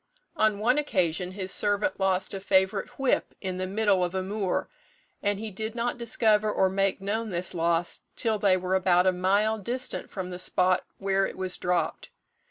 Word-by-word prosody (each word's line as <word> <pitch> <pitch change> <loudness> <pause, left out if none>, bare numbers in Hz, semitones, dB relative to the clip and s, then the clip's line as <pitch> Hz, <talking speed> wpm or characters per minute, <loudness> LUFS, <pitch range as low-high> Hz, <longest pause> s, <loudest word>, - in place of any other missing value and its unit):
On 215 -7 +2
one 245 +7 +2
occasion 180 - -1
his 190 -1 -1
servant 205 +7 +2
lost 190 0 +1
a 195 - -4
favourite 190 +1 +1
whip 270 -2 0
in 185 -2 -4
the 185 - -2
middle 200 -1 +2
of 180 +1 -2
a 190 - -1
moor, 195 -1 -2 0.5
and 205 0 0
he 220 0 -5
did 220 +3 -5
not 240 +1 -2
discover 215 -2 +2
or 190 -2 +2
make 195 0 0
known 220 +3 -2
this 175 -1 -1
loss 170 0 0 0.2
till 220 -2 0
they 195 -3 +4
were 185 0 -2
about 180 -1 +3
a 185 - +5
mile 200 +4 +1
distant 250 +6 -3
from 185 -2 -5
the 180 - -6
spot 185 0 +1
where 195 0 +1
it - - -9
was 185 -1 0
dropped. 175 -3 -2
195 Hz, 185 wpm, -27 LUFS, 185-215 Hz, 0.5 s, a